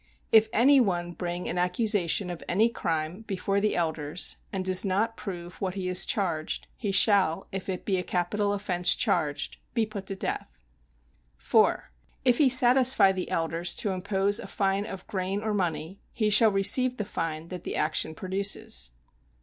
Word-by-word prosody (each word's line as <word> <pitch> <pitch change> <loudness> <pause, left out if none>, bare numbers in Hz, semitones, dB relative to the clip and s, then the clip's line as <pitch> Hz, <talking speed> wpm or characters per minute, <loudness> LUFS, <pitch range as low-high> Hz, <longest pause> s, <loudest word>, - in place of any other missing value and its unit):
If 220 0 +5
any 270 +5 +5
one 175 -7 0
bring 175 0 -5
an 180 - -3
accusation 180 -1 0
of 175 - -8
any 215 +6 +3
crime 165 -3 -3
before 195 0 -1
the 215 - 0
elders, 160 -1 -1
and 190 -1 -4
does 185 -1 +4
not 210 +4 -1
prove 175 -4 -8
what 190 -1 -3
he 190 -2 -4
has 180 0 +3
charged, 170 -8 -2
he 205 -4 -3
shall, 195 -4 +4
if 195 0 -5
it 185 - -4
be 195 -2 0
a - - -3
capital 200 +4 -1
offence 185 -3 +1
charged, 145 -1 -1 0.2
be 230 -2 +2
put 205 -3 -8
to 195 - -4
death. 65 - -5 0.8
4. - - +1 0.3
If 245 -2 +3
he 285 -4 +5
satisfy 250 -5 +5
the 185 -1 -4
elders 165 +1 -1
to 205 - -1
impose 195 +2 0
a - - -8
fine 195 +1 -1
of 195 -3 -8
grain 195 +1 -3
or 215 -1 -2
money, 180 -1 -3
he 215 -3 -1
shall 215 +1 +7
receive 250 +6 +3
the 210 - -3
fine 165 -2 -5
that 180 -1 -7
the - - -4
action 160 0 0
produces. 190 - -1
190 Hz, 175 wpm, -27 LUFS, 175-210 Hz, 0.8 s, shall